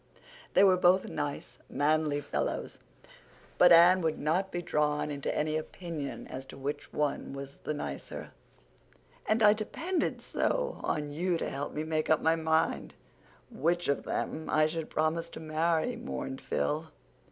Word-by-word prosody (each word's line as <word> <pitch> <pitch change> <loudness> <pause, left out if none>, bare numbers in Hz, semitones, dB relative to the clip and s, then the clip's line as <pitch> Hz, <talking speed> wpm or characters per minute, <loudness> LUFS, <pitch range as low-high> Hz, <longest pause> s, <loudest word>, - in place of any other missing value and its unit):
They 190 - +7
were 190 -2 +6
both 180 +1 +4
nice, 145 -1 -4
manly 150 0 +1
fellows, - - -3 0.8
but 180 - +8
Anne 175 +2 +8
would 160 -2 0
not 175 +6 0
be 175 0 -3
drawn 150 -1 0
into 140 -1 -2
any 155 +1 +1
opinion 155 -2 -5
as 130 - -7
to - - -11
which 145 +2 -5
was 140 -1 -3
the - - -1
nicer. 70 - -6 1.0
"And 220 +1 +2
I 210 0 +8
depended 315 - -2
so - - -1
on 150 -1 -1
you 175 +3 0
to - - -3
help 140 +1 -4
me 150 - -1
make 155 -1 -1
up 160 - +5
my 160 0 +3
mind 160 0 0 0.6
which 175 +4 0
of 140 - +1
them 160 0 -3
I 155 0 +4
should 160 0 -3
promise 160 +2 0
to - - -9
marry," 160 +7 0
mourned 135 - -5
Phil. 155 +2 -1
160 Hz, 150 wpm, -30 LUFS, 150-175 Hz, 1.0 s, but